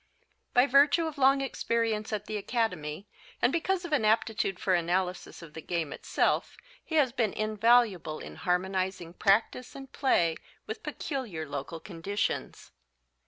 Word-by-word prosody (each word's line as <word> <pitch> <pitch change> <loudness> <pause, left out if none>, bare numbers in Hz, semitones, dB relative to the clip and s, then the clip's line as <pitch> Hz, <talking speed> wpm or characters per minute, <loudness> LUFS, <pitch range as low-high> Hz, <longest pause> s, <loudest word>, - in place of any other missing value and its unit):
By 245 +1 +7
virtue 285 +5 +4
of 310 -3 -5
long 275 +1 +5
experience 230 -4 -1
at 210 -1 -3
the 215 - -5
Academy 200 -6 -2 0.3
and 250 - +2
because 360 +2 0
of 335 - -4
an 275 -7 +2
aptitude 215 -3 +1
for 190 - +1
analysis 180 +1 -1
of 155 -3 -12
the 160 - -7
game 165 -3 -2
itself - - 0 0.3
he 320 - -5
has 280 -5 +4
been 235 -5 0
invaluable 215 -6 +2
in - - -9
harmonizing 185 -1 -1
practice 210 +6 +1
and 270 -1 -10
play 170 - +2 0.3
with - - -6
peculiar 230 - -4
local 140 +3 -5
conditions. 200 +4 -4
215 Hz, 145 wpm, -29 LUFS, 180-255 Hz, 0.3 s, By